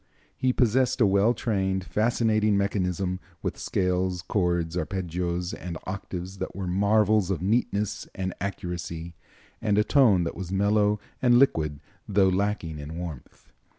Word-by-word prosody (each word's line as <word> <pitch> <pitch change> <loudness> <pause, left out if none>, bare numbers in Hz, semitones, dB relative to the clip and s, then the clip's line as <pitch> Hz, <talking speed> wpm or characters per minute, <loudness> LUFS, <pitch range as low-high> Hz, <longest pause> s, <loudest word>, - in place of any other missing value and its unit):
He 130 - +1
possessed 125 +1 +2
a 115 - +6
well 100 +4 +3
trained, 95 -4 -1
fascinating 110 0 +2
mechanism, 95 -2 -1 0.2
with - - -3
scales, 90 -2 0
chords, 85 -4 0
arpeggios 90 -1 -2
and 85 -2 -6
octaves 95 -1 -6
that - - -4
were 95 0 -4
marvels 100 +1 +3
of 90 -3 -1
neatness 105 -1 0
and 95 -1 -3
accuracy, 85 -3 -4 0.5
and 105 -2 +1
a 105 - +5
tone 105 -9 +4
that 85 - -3
was 95 -2 -6
mellow 105 +1 +2 0.2
and 120 -1 +5
liquid, 80 - +2 0.3
though 100 -1 +4
lacking 95 -5 -1
in 75 +3 -7
warmth. 85 -7 -8
95 Hz, 140 wpm, -26 LUFS, 90-105 Hz, 0.5 s, a